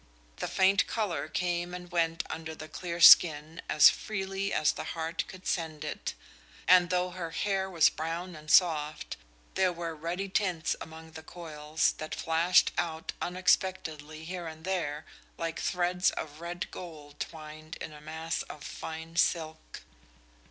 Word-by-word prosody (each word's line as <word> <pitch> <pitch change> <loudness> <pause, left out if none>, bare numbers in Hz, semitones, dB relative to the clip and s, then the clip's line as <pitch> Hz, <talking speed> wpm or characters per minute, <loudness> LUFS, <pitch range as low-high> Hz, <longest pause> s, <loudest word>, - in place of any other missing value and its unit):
The - - -3
faint 195 +1 +3
color 210 -7 -2
came 175 0 -2
and 180 0 -9
went 165 -1 +1
under 160 0 -6
the 155 - -9
clear 170 +2 -5
skin 160 -1 +7
as 150 - +8
freely 195 -1 -3
as 150 - +3
the - - -6
heart 165 +1 -2
could 185 0 -11
send 160 -4 -2
it, - - -4 0.5
and 180 -1 +7
though 180 0 +1
her 175 -2 -5
hair 190 +2 -1
was 170 -4 +5
brown 165 +3 -4
and 155 0 -11
soft, 155 -3 +3 0.4
there 185 -1 +3
were 170 -1 -4
ruddy 170 +5 -3
tints 185 -4 0
among 160 0 -10
the 160 - -9
coils, 160 -2 -1
that 155 - -4
flashed 170 +3 +3
out 160 -1 -3
unexpectedly 170 -4 0
here 175 0 -5
and 160 +1 -9
there 160 -5 -2 0.3
like 165 0 -3
threads 180 0 +1
of 155 +1 -6
red 175 +1 -5
gold 150 -5 -10
twined 155 0 -7
in 155 - -7
a 150 - -12
mass 160 +2 -3
of 150 - -9
fine 160 +2 -7
silk. 160 -2 0
165 Hz, 150 wpm, -30 LUFS, 155-180 Hz, 0.5 s, as